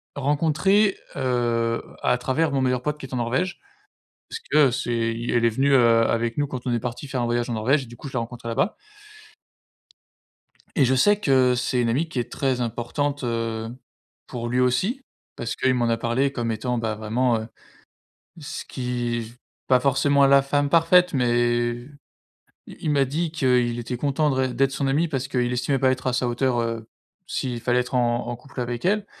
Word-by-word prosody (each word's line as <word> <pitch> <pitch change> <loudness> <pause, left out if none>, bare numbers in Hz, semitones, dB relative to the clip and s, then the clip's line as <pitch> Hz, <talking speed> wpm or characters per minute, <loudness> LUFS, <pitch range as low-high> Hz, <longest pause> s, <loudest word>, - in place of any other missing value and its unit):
rencontrée, 160 +8 +2 0.2
heu, 120 -3 0 0.2
à 125 - +2
travers 145 +5 0
mon 135 -1 0
meilleur 125 -1 +1
pote 150 +3 -2
qui - - -7
est 130 - -11
en - - -1
Norvège, 130 +11 -1 0.7
parce 455 - -6
que 150 -3 +5
c'est, 115 -2 -1
i 115 +1 -4
elle 120 -1 +2
est - - +6
venue, 135 +5 +1
heu, 115 -3 +5
avec 115 0 -1
nous 145 - +1
quand 130 -2 -6
on 125 - 0
est 120 - 0
partis 125 +5 -5
faire 130 -3 -2
un - - 0
voyage 120 0 -1
en 120 - -2
Norvège 130 +6 +1
et - - -14
du 120 +1 -12
coup, 140 - -8
je 135 - -13
l'ai - - +1
rencontrée 115 0 -6
là-bas. 115 - 0 2.0
Et 140 - +4
je 130 +2 +2
sais 205 +10 +4
que 130 -8 +3
c'est 125 +1 0
une 115 - +1
amie 140 +9 0
qui 135 - -3
est 120 0 -4
très 130 -3 -1
importante, 120 +5 -2
heu, 115 -1 -2 0.6
pour 120 -1 -5
lui 125 +1 0
aussi 130 - +1 0.3
parce 120 - -4
qu'il 130 - +2
m'en 120 -2 +1
a 115 - +2
parlé 120 +4 0
comme 120 -3 -2
étant, 120 +3 -2
bah, 110 -2 -2
vraiment, 115 +3 0
heu, 110 - -7 0.9
ce 150 +1 -6
qui 120 -2 -3
v 115 +1 -10 0.3
pas 130 -1 +5
forcément 140 +2 +3
la 140 0 +6
femme 145 +1 0
parfaite, 170 +2 +4
mais 120 -2 +2 1.0
i - - -11
il 155 - 0
m'a 140 -2 +3
dit 155 +4 -2
qu'il 125 -6 +1
était 120 +1 -4
content 145 +3 +1
de 135 - 0
ré 130 -1 0
d'être 135 +1 +2
son 135 +1 -2
ami 150 +5 +2
parce 135 -4 -3
qu'il 125 -2 0
estimait 125 +2 0
pas 130 0 +3
être 130 0 -3
à 130 - +1
sa 125 0 0
hauteur, 120 0 0
heu, 115 -1 -4 0.4
s'il 125 -3 -3
fallait 125 +1 +2
être 125 +1 -3
en 120 -1 +1
en 120 - -3
couple 130 +3 -11
avec 120 0 -4
elle. 205 +2 +1
125 Hz, 205 wpm, -24 LUFS, 120-140 Hz, 2.0 s, est